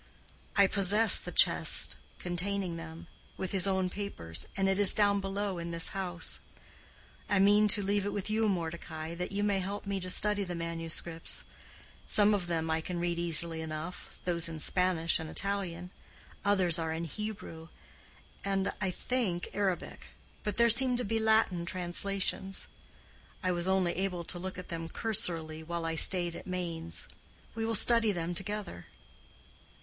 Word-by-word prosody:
I 200 - +6
possess 200 +3 +5
the - - -6
chest - - +5 0.2
containing 180 0 -3
them, 165 0 -9 0.3
with 190 - -4
his 195 -1 +3
own 190 -1 0
papers, 90 - -6
and 195 0 +1
it 195 +1 +1
is 205 -2 +7
down 205 -1 +3
below 195 -1 -3
in 170 0 -6
this 170 -1 0
house. 180 -3 -3 0.9
I 205 - +2
mean 205 +2 +4
to 205 0 +4
leave 200 +1 0
it 205 - -3
with 200 -1 -4
you, 220 0 +1
Mordecai, 165 -2 -5
that 180 +2 -5
you 200 +1 -2
may 200 -2 +1
help 200 +3 -5
me 200 -1 -3
to 185 0 -6
study 205 +2 +3
the 180 -2 -5
manuscripts. 165 0 -2 0.6
Some 210 0 +5
of 190 -4 -2
them 165 -2 -2
I 160 0 0
can 175 +1 -5
read 170 0 -2
easily 165 -1 +3
enough—those 165 +2 -4
in 160 - -7
Spanish 175 -1 +1
and 160 -1 -7
Italian. 180 -3 -3 0.5
Others 185 -4 +2
are 160 -1 -3
in 160 +1 -4
Hebrew, 170 -3 -7 0.8
and, 195 -1 -1
I 190 - 0
think, 185 -2 -3
Arabic; 195 -3 -3 0.3
but 210 -3 -4
there 235 0 +5
seem 250 +1 +6
to 245 - -2
be 225 +2 -1
Latin 220 -5 +2
translations. 190 +2 -2 0.8
I 185 - +1
was 175 0 -2
only 190 -2 +1
able 180 -2 -3
to 175 +1 -6
look 185 +1 -6
at 185 - -9
them 165 -1 -5
cursorily 165 -9 0
while 170 +1 -5
I 165 - -2
stayed 175 +1 +2
at - - -10
Mainz. 170 -3 -5 0.5
We 225 0 -3
will 225 - 0
study 230 +1 +8
them 175 -2 -3
together." 195 - -5
185 Hz, 165 wpm, -30 LUFS, 170-200 Hz, 0.9 s, study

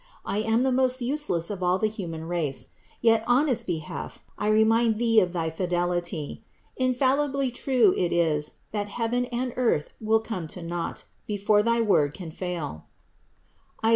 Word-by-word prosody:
I 205 - -1
am 225 +3 +2
the 265 - +2
most 255 0 +2
useless 245 - -1
of 195 -2 -5
all 180 +1 +2
the 215 - 0
human 175 -7 -4
race; 165 -6 -2 0.3
yet 225 -1 +4
on 255 +5 +4
its 240 -4 0
behalf 160 -6 -5 0.2
I 210 - -2
remind 220 +1 +4
Thee 225 -1 +4
of 180 -4 +1
thy 165 -2 -2
fidelity. 175 -2 -2 0.3
Infallibly 265 +1 +1
true 245 -5 +3
it 175 -2 0
is, 155 -3 +1 0.2
that 205 -1 -2
heaven 240 +3 -1
and 245 0 -3
earth 230 -12 +1
will 220 0 +3
come 185 -8 -5
to 175 - -7
naught, 170 0 -4 0.2
before 205 0 +2
thy 230 +2 +2
word 150 -9 +2
can 175 -4 -7
fail 165 - -5 1.0
(Is. 225 - +4
215 Hz, 165 wpm, -26 LUFS, 175-240 Hz, 1.0 s, yet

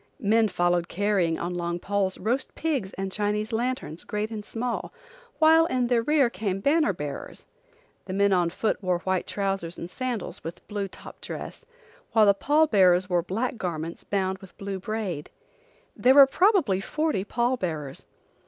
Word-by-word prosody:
Men 220 -1 +3
followed 175 -2 +1
carrying 190 -4 +1
on 175 +1 -3
long 175 0 -2
poles 195 +1 -1
roast 245 +7 -2
pigs 275 -12 -1
and 195 0 -4
Chinese 210 +2 -1
lanterns, 230 - -2
great 210 +1 -3
and 215 -2 -5
small, 235 +3 -3 0.5
while 320 +1 +6
in 255 -4 0
their 240 -1 +2
rear 290 +1 +3
came 200 -5 -3
banner 295 +3 +3
bearers. 150 -6 -7 0.6
The 185 - -5
men 200 0 +3
on 175 -2 +2
foot 210 +5 -1
wore 185 -2 +1
white 190 -1 -1
trousers 195 -4 -2
and 170 - -7
sandals, 250 -3 -4
with 165 - -8
blue 205 -2 -3
top - - -13
dress, - - -7 0.5
while 220 -2 +6
the 200 - +6
pall 295 +9 +3
bearers 185 - +4
wore 175 -1 +3
black 225 +8 -2
garments 170 -4 -4
bound 190 -1 -1
with 190 -2 -15
blue 195 -2 -4
braid. 190 -6 -4 0.7
There 260 +2 +4
were 280 -1 +10
probably 320 - +3
forty 305 -3 -1
pall 240 +4 0
bearers. 155 - -5
200 Hz, 165 wpm, -26 LUFS, 180-240 Hz, 0.7 s, were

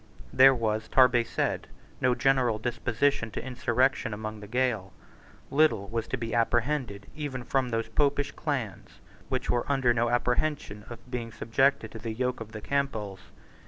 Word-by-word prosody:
There 135 0 +7
was, 110 -2 -1
Tarbet 125 -3 +4
said, - - -1 0.3
no 125 -1 +3
general 130 -5 +2
disposition 120 +2 0
to - - -5
insurrection 125 -2 0
among 110 0 -6
the 105 - -10
Gael. 115 -5 0 0.6
Little 145 -9 +3
was 115 -1 -2
to 130 - -2
be 115 -2 -4
apprehended 120 -2 0
even 145 -5 -4
from 130 +1 0
those 115 -1 -1
popish 145 +4 +1
clans 130 - -4 0.3
which - - -1
were 120 +3 0
under 130 -3 +3
no 120 0 +1
apprehension 120 -3 -1
of 120 +1 -11
being 120 -2 -4
subjected 115 +1 +1
to 110 - -8
the 110 0 -4
yoke 125 +1 -2
of 110 -1 -8
the 110 -1 -7
Campbells. 110 -9 -2
120 Hz, 160 wpm, -28 LUFS, 110-135 Hz, 0.6 s, There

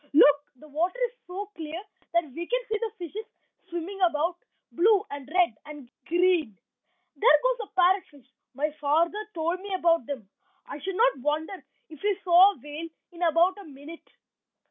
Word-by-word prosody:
Look! 290 -1 +8 0.2
the 305 +5 -16
water 335 - -1
is - - -24 0.2
so 395 +3 -6
clear 320 +1 -6 0.3
that 340 0 +3
we 340 +6 -6
can - - +1
see 435 -2 -1
the 450 -1 -3
fishes 365 +5 -6 0.5
swimming 350 +3 -5
about, 335 0 +2 0.4
blue 410 +3 +3
and 280 -1 -7
red 355 -7 +3
and 290 -5 -11 0.2
green. 345 - +2 0.6
There 485 +4 +5
goes 485 -4 0
a - - -46
parrot 370 +2 +5
fish; 285 -4 -19 0.3
my 300 +3 -1
father 330 +7 +2 0.2
told 335 +2 -1
me 400 +1 -8
about 335 -7 +2
them. 255 -8 -6 0.4
I 290 - -8
should 380 +6 -4
not 475 - +3
wonder 300 +7 -1 0.4
if 310 -3 -13
we 410 -1 0
saw 365 +3 +7
a - - -18
whale 300 +3 -7 0.2
in 345 0 -13
about 345 +3 +3
a - - -9
minute." 295 +3 -12
340 Hz, 175 wpm, -27 LUFS, 300-385 Hz, 0.6 s, Look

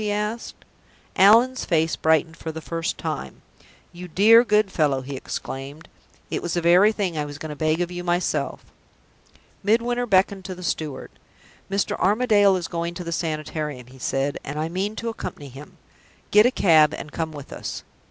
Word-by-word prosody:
he 210 -1 -1
asked. 210 +3 -3 0.6
Allan's 230 +7 +5
face 160 -2 +1
brightened 160 +1 +1
for 160 - -6
the 160 - -7
first 165 +1 -3
time. 65 -1 -5 0.5
"You 180 +1 -8
dear, 220 +7 +6
good 210 -3 +2
fellow!" 145 -6 +1
he 135 +1 -7
exclaimed. 135 +4 -7 0.4
"It - - -2
was 175 - -3
the 175 - 0
very 180 +5 +5
thing 195 -6 -2
I 150 - -1
was 145 0 -8
going 155 0 -7
to - - -6
beg 155 +3 0
of 175 0 -2
you 175 0 -5
myself." 175 +1 -1 1.0
Midwinter 240 +4 +1
beckoned 190 -1 +2
to 185 - -5
the 180 - -10
steward. 155 -4 -4 0.6
"Mr. 195 +1 0
Armadale 205 -1 +4
is 180 -2 -3
going 170 0 -4
to 180 - -6
the 170 - -5
Sanitarium," 155 -5 -3
he 130 +2 -16
said, 135 +2 -1
"and 140 +2 -6
I 155 +1 -2
mean 195 +5 -2
to 230 +1 -3
accompany 145 -10 -7
him. 135 +4 -13 0.5
Get 210 +3 +7
a - - +1
cab 155 - +4
and 150 - -8
come 160 -1 -3
with 145 -3 -10
us." - - -6
170 Hz, 180 wpm, -23 LUFS, 155-205 Hz, 1.0 s, Get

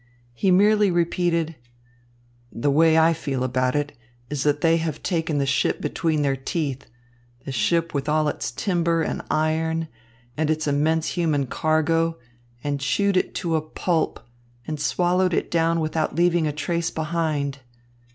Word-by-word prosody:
He 190 +11 0
merely 205 +2 +5
repeated: 170 -2 0 1.0
"The 140 +5 0
way 160 +2 +4
I 160 +1 +5
feel 140 -5 -3
about 130 +1 0
it 145 0 -2 0.4
is 145 -2 -2
that 145 0 +1
they 165 -1 +4
have 160 -3 -3
taken 165 -4 -1
the 140 - +1
ship 135 -1 +1
between 160 -4 -1
their 140 -1 +1
teeth, 140 0 -3 0.6
the - - -4
ship 165 +9 +1
with 140 +1 -2
all 155 0 +2
its - - -2
timber 170 - 0
and - - -3
iron 160 +1 0 0.5
and 155 0 0
its 155 0 0
immense 155 +3 +1
human 155 -5 0
cargo, 160 +4 +1 0.5
and 145 -1 -1
chewed 200 +8 +1
it 185 - 0
to 165 -2 -1
a 160 - +1
pulp, 160 +1 -1 0.5
and 155 -1 -4
swallowed 180 +3 +1
it - - -2
down 165 0 +2
without 155 -1 -1
leaving 170 -1 +2
a - - 0
trace 170 +3 -2
behind." 155 -3 -2
160 Hz, 155 wpm, -23 LUFS, 145-170 Hz, 1.0 s, merely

